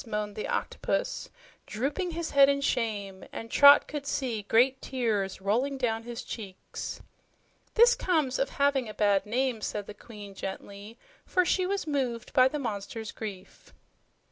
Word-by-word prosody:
moaned 210 -2 -3
the 215 - -4
Octopus, - - -2 0.4
drooping 285 - -2
his 335 -1 -4
head 280 0 +7
in 280 0 +2
shame, 210 -8 -2
and 225 0 -7
Trot 285 0 +8
could 290 -1 -5
see 245 -7 -1
great 250 +6 +3
tears 215 -7 -1
falling 240 +9 0
down 225 -3 0
his 240 0 -7
cheeks. 195 -5 -7 0.7
"This 475 +2 +7
comes 315 - 0
of 270 - +1
having 280 -4 +2
a 210 - -8
bad 205 -1 +2
name," 245 0 0
said 205 -1 -3
the 210 - -8
Queen 205 -2 -11
gently, 200 +3 -7 0.3
for 365 -1 +1
she 370 +1 +1
was 395 +1 -1
moved 260 -6 -2
by 255 0 +6
the 300 - -3
monster's 220 -3 -4
grief. 200 -4 -9
235 Hz, 155 wpm, -28 LUFS, 210-280 Hz, 0.7 s, Trot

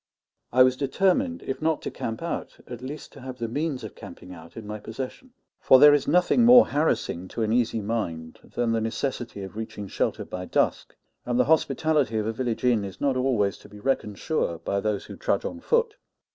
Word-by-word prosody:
I 130 +1 +7
was 130 0 +3
determined, 195 - +1
if 135 - -4
not 160 -1 0
to - - -4
camp 115 +7 -5
out, 170 - -4
at 120 -1 -8
least 140 +4 -8
to - - -12
have 130 0 -7
the 115 -2 -3
means 145 +3 -2
of - - -7
camping 90 - -11
out 85 +2 -13
in 110 - -7
my 105 +1 -6
possession; 130 - -7 0.3
for 130 - +6
there 145 +2 +8
is 145 -2 +1
nothing 180 +7 +4
more 245 +1 +9
harassing 135 - 0
to 115 - -3
an 110 0 0
easy 115 -2 +1
mind 85 -7 -4 0.2
than 120 -1 +1
the 115 -1 +1
necessity 115 -2 -3
of 95 +1 -9
reaching 110 -2 -6
shelter - - -2
by 90 0 -6
dusk, - - 0 0.3
and 120 0 -1
the 125 - +4
hospitality 150 -4 +2
of 105 - -1
a 110 - -1
village 120 -1 -3
inn 120 -4 +3
is 95 -1 -8
not 140 -2 +1
always 125 -6 +1
to - - -15
be 105 0 -12
reckoned 105 -4 -1
sure 155 - -1
by 100 +4 -2
those 105 -1 -2
who - - -9
trudge 100 - -1
on 265 - -5
foot. 465 - +1
125 Hz, 215 wpm, -26 LUFS, 105-145 Hz, 0.3 s, more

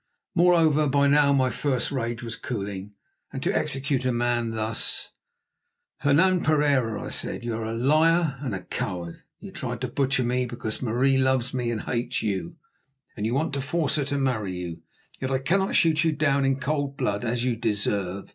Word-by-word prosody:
Moreover, 165 -4 +4
by 140 +1 +3
now 140 0 +5
my 130 -2 +3
first 130 +1 -1
rage 120 -3 -3
was 115 -1 -4
cooling, 100 -3 -5 0.4
and - - -5
to - - 0
execute 135 -1 0
a 130 - +1
man 120 -1 0
thus— 110 0 -1 0.9
"Hernan 170 +6 +3
Pereira," 140 -8 +2
I - - -5
said, - - -3
"you 120 -1 -2
are 110 0 -3
a 110 - -3
liar 155 +3 +3
and 130 -8 -3
a 90 - -6
coward. 85 -3 -4 0.2
You - - -10
tried - - -5
to - - -1
butcher 135 -1 +1
me 125 +1 0
because 115 -2 -4
Marie 130 +3 +2
loves 130 -1 +1
me 125 -2 -1
and 115 -2 -2
hates 120 0 -2
you, 95 -5 -2 0.6
and 105 0 -2
you 120 - -1
want 155 +2 0
to 140 - -1
force 155 +2 0
her 145 - 0
to 140 +1 -1
marry 110 -9 -1
you. 85 -2 -6 0.4
Yet 130 - -2
I 135 - +1
cannot 190 +9 0
shoot 160 -1 +4
you 160 -1 +2
down 140 -2 +2
in 135 0 +1
cold 140 -1 -2
blood 105 -5 -1
as 120 +1 -1
you 125 -2 +1
deserve. 100 -3 -2
130 Hz, 190 wpm, -25 LUFS, 115-140 Hz, 0.9 s, now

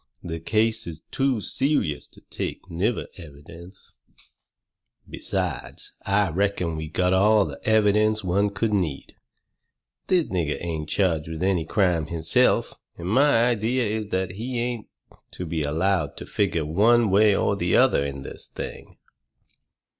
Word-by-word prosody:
The 80 -1 -5
case 110 +5 0
is 80 -2 -8
too 135 -5 0
serious 130 - 0
to - - -19
take - - -5
nigger 100 +8 -1
evidence. 85 +3 -13 1.2
Besides, - - -3 0.2
I 100 -2 +2
reckon 90 -2 0
we 80 0 -5
got 90 +4 +1
all 105 +2 +4
the - - -7
evidence 110 0 +3
any - - -5
one 100 +3 +2
could 105 +2 -1
need. 85 -9 -2 0.9
This 180 -4 +3
nigger 85 -5 -1
ain't 80 -3 -4
charged 85 -6 +1
with 80 +1 -5
any 95 -4 +1
crime 85 -4 +1
himself, 85 -1 +2 0.2
and 85 +2 -5
my 130 0 +4
idea 120 +2 +1
is 110 -1 -2
that 95 -2 -1
he 120 +6 -4
ain't 120 -2 -3 0.5
to 90 - -5
be 80 -1 -2
allowed 80 +3 0
to - - -7
figure 85 -6 0
one 110 +7 +3
way 105 +1 +5
or 100 - +1
the 90 -2 0
other 125 - +4
in 70 -1 -5
this - - -9
thing." - - -8
95 Hz, 145 wpm, -24 LUFS, 85-110 Hz, 1.2 s, way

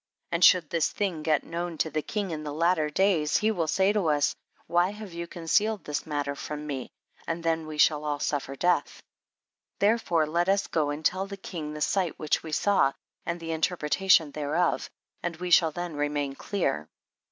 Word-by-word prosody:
And 170 +1 +1
should 170 -5 +6
this 165 -2 +2
thing 185 -6 -2
get 155 -2 +1
known 170 0 -4
to 160 - 0
the 155 - -1
king 200 +2 -3
in 155 -1 -4
the 150 - -4
latter 160 0 +2
days, 160 -3 +2
he 215 +1 +2
will 170 -6 -1
say 190 +5 +2
to 205 -6 +1
us, 145 -1 +2 0.3
why 175 +2 +2
have 210 -2 -9
you 170 0 -5
con 170 0 -9
cealed 210 +5 +2
this 150 +1 -4
matter 145 -2 -2
from 150 +1 -6
me, 135 -4 -4 0.4
and 165 0 -3
then 165 -1 0
we 155 -1 -6
shall 150 0 +4
all 150 -1 -1
suffer 140 -2 -2
death; 180 +5 0 0.7
therefore, 200 -7 +2
now 155 - -8
let 175 +3 +1
us 200 0 +2
go 150 -3 0
and 150 +2 -5
tell 190 +4 +1
the 200 0 -7
king 160 -6 -6
the 150 - -7
sight 185 0 0
which 155 - 0
we 160 - -8
saw, 155 -5 +3 0.3
and 170 0 -2
the 165 0 -5
inter 160 +3 0
pretation 155 -1 +3
thereof, 155 +4 0 0.3
and 175 -1 -3
we 180 +2 -5
shall 165 -2 +6
tlien 175 0 -5
remain 145 -1 -1
clear. 135 - -2
165 Hz, 205 wpm, -27 LUFS, 150-180 Hz, 0.7 s, should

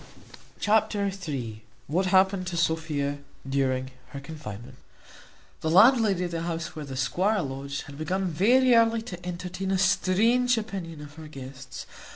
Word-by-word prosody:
Chapter 210 -1 +2 0.2
iii. 115 -7 -4 0.2
What 180 +6 0
happened 190 0 +3
to 175 -2 -3
Sophia 155 -4 0 0.3
during 130 -1 0 0.2
her 140 - -5
confinement. 135 -7 -9 0.8
The 160 - -1
landlady 205 0 +5
of 175 - -3
the 165 -1 -2
house 170 0 -4
where 155 -2 -5
the 135 -2 -6
squire 190 +9 +1
lodged 140 +1 -5
had 145 0 -11
begun 185 +5 -1
very 240 +10 +4
early 230 -1 +4
to 180 -6 -8
entertain 180 +2 -4
a 190 - +2
strange 225 +7 +3
opinion 185 -8 -5
of 145 -1 -10
her 160 -1 -9
guests. 130 -3 -9
170 Hz, 150 wpm, -27 LUFS, 145-195 Hz, 0.8 s, landlady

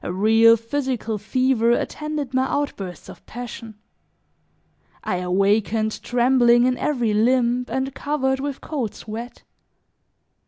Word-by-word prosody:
A - - -3
real 225 +4 +5
physical 230 -2 -3
fever 250 +1 +1
attended 300 0 -3
my 260 0 +2
outbursts 195 - -4
of - - -12
passion; 235 -2 -8 1.3
I 180 - -1
awakened 205 +4 0
trembling 240 -1 +3
in 255 0 +2
every 245 -7 0
limb 245 +2 +2
and 265 0 -2
covered 265 -2 -1
with 280 0 -4
cold 265 -9 -4
sweat. 230 +3 -8
240 Hz, 115 wpm, -22 LUFS, 220-265 Hz, 1.3 s, real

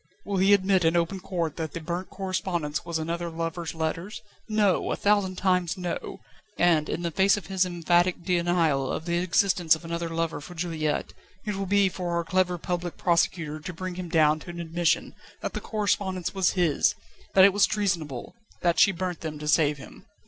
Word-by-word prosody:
Will 200 -1 -2
he 190 +2 +4
admit 190 -1 +2
in 165 +1 +3
open 170 +3 0
court 170 -5 -3
that 160 -2 -4
the - - -4
burnt 175 +3 -4
correspondence 185 -6 -2
was 170 -1 -3
another 170 +2 -3
lover's 165 0 -4
letters? 165 +5 -3 0.3
No! 210 -3 +2
a - - +1
thousand 200 -2 +2
times 180 -2 +1
no! 180 -2 -5 0.4
and, 165 -3 +3
in 175 - -3
the 170 - -1
face 195 +4 +3
of 200 - -7
his 190 +1 +1
emphatic 175 0 +1
denial 170 -6 +1
of 160 - -4
the 170 0 0
existence 180 -1 +3
of 160 - -11
another 170 0 -3
lover 165 -2 -2
for 175 +4 -10
Juliette, 160 -3 -2 0.3
it 210 - -1
will 195 0 -3
be 200 0 +4
for 180 -2 -3
our 170 - 0
clever 180 +1 +1
Public 175 0 -4
Prosecutor 170 -3 +1
to 180 +4 -7
bring 185 +2 -5
him 180 -1 -6
down 155 -2 +3
to 175 - -11
an 170 0 -7
admission 170 0 0 0.3
that - - -3
the - - -4
correspondence 200 -4 -1
was 190 -2 +2
his, 175 -6 +2 0.4
that 190 -1 +9
it 200 - +5
was 205 - +4
treasonable, 170 - -2 0.3
that 175 -1 +2
she 195 - +6
burnt 180 -1 -4
them 155 -2 -5
to 150 0 -7
save 150 -1 +3
him." 140 - -13
175 Hz, 195 wpm, -26 LUFS, 165-185 Hz, 0.4 s, that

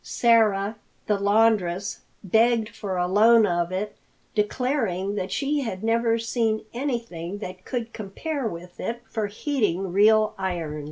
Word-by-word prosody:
Sarah, 215 -3 +2 0.3
the 210 -2 +1
laundress, 200 -3 +2 0.2
begged 225 +3 +3
for 200 -4 -5
a 180 - +1
loan 220 +4 +6
of 175 -2 0
it, 200 +3 -3 0.4
declaring 210 -3 0
that 190 -2 -3
she 290 +1 0
had 220 -7 -4
never 230 0 +2
seen 225 -1 -1
anything 230 - -3
that 185 -2 -8
could 235 -2 -4
compare 245 +7 -4
with 175 -2 -8
it 235 +1 -4
for 220 -2 -2
heating 205 - -1
real 215 +2 +5
irons. 170 -5 -3
215 Hz, 135 wpm, -25 LUFS, 190-230 Hz, 0.4 s, loan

